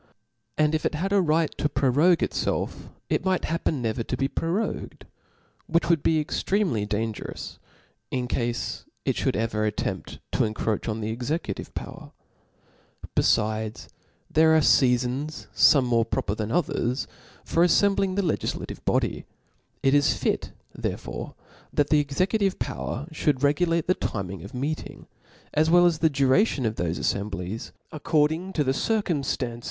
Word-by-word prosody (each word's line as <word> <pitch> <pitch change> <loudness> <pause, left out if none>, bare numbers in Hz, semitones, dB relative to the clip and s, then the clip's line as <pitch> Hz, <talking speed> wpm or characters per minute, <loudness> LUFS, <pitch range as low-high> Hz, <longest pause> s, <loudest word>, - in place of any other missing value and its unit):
And 155 0 +3
if 155 - 0
it - - 0
had 195 +6 -1
a 200 - +5
right 160 -1 +1
to 150 - +1
prorogue 145 +6 +3
itfclf, - - -3 0.2
it - - 0
might 190 -1 +1
happen 160 -5 -1
ncv^r 115 0 -2
to - - -2
be 135 - +1
prorogued, 170 +9 -3 0.6
which 170 +1 +1
would 165 -4 +3
be 160 -1 +3
extremely 155 - 0
dan 110 +2 -1
gerous, - - -8 0.5
in 125 -1 -2
cafe 120 -1 -2 0.2
it - - 0
fliould - - 0
ever 110 0 0
attempt 105 -1 -3
to - - -2
incroach 110 0 -1
on 110 +1 -2
the 110 +1 -2
executive 120 - -3
power. - - -8 1.0
Befides 110 0 +1 0.4
there 160 0 +5
arefcafons, 125 +3 +2
fome 140 -3 +6
more 115 -2 +2
proper 105 -3 -1
than 110 0 -3
others, 135 -6 0 0.4
for 170 - +2
aflcmbling 195 +1 +3
the 200 - +1
legiflative 165 - -3
body: - - 0 0.6
it 135 - +4
is 145 0 +3
fit - - -1 0.2
therefore - - -5 0.4
that 145 -1 +1
the 150 - +6
exe 140 -1 -3
cutive 200 -2 0
power 135 +5 -4 0.2
(hould 145 -3 +2
regulate 165 +3 +2
the 185 - +3
time 95 - -3
of 130 - -9
meeting, 145 +5 -4 0.5
as 155 +1 +3
well 175 +1 +6
as 170 -3 +2
the 160 - +4
duration 140 - +2
of 110 - +1
thofe 85 -5 -2
aflcmblies, 100 +1 -3 0.2
accord 150 0 +2
ing 180 +4 -4
to 155 - +1
the 130 - +1
circutnftancc? 140 - -1
145 Hz, 150 wpm, -26 LUFS, 115-165 Hz, 1.0 s, fome